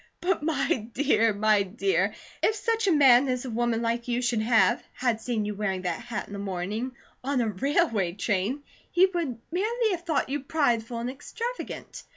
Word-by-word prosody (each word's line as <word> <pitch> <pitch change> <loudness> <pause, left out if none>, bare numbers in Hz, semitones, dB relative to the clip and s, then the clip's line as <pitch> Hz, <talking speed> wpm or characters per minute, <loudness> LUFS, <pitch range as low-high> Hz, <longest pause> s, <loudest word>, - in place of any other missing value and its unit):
"But 360 -1 0
my 275 -7 0
dear, 245 -6 +3
my 210 0 +3
dear! 235 - 0 0.3
If 435 - +3
such 450 0 0
a - - +5
man 275 -4 +6
as 250 0 -1
a 250 - -4
woman 235 0 0
like 235 +1 -1
you 245 +1 0
should 240 -3 +1
have, 220 -4 +3
had 240 -3 0
seen 225 -4 -1
you 210 - -2
wearing 195 -2 -2
that 175 +1 -2
hat 235 -2 -4
in - - -11
the 200 - -5
morning, 200 +6 -3 0.3
on 270 0 0
a 230 -2 +1
railway 220 - +1
train, 205 +7 -1 0.3
he 360 +2 +5
would 340 -10 -2
merely 440 +5 +1
have 350 -3 -2
thought 320 -6 0
you 285 +2 -1
prideful 250 -6 0
and 235 +1 -3
extravagant. 470 - -6
245 Hz, 190 wpm, -27 LUFS, 215-300 Hz, 0.3 s, man